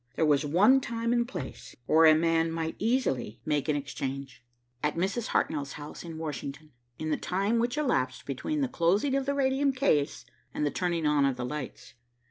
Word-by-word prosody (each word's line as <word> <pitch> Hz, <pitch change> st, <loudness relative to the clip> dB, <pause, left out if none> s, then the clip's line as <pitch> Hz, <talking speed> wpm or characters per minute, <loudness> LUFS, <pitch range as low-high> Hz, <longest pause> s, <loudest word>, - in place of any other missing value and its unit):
There 160 Hz, -, +2 dB
was 145 Hz, -1 st, +3 dB
one 205 Hz, -, +5 dB
time 230 Hz, -1 st, -1 dB
and 235 Hz, -1 st, +1 dB
place 175 Hz, -, -7 dB
where 160 Hz, +4 st, +6 dB
a 155 Hz, -, +8 dB
man 165 Hz, 0 st, +2 dB
might 165 Hz, 0 st, -3 dB
easily 205 Hz, -, 0 dB
make 150 Hz, 0 st, 0 dB
an 150 Hz, -, +2 dB
exchange. 135 Hz, -3 st, -5 dB, 0.4 s
At 150 Hz, -, 0 dB
Mrs. 195 Hz, +7 st, -1 dB
Hartnell's 140 Hz, -2 st, -1 dB
house 150 Hz, 0 st, -8 dB
in 165 Hz, -2 st, -7 dB
Washington, 150 Hz, -1 st, -6 dB, 0.3 s
in 155 Hz, 0 st, -3 dB
the -, -, +1 dB
time 200 Hz, +5 st, 0 dB
which 240 Hz, +4 st, 0 dB
elapsed 130 Hz, -, 0 dB
between 145 Hz, -, -2 dB
the 270 Hz, -, +2 dB
closing 205 Hz, +5 st, +1 dB
of 275 Hz, 0 st, 0 dB
the 280 Hz, -, +1 dB
radium 275 Hz, 0 st, +2 dB
case 205 Hz, -, +1 dB, 0.3 s
and 150 Hz, -, 0 dB
the 145 Hz, -, 0 dB
turning 170 Hz, -3 st, -1 dB
on 150 Hz, -1 st, +3 dB
of 135 Hz, -2 st, +2 dB
the 125 Hz, -1 st, -4 dB
lights. 150 Hz, +1 st, -6 dB
165 Hz, 190 wpm, -29 LUFS, 145-235 Hz, 0.4 s, a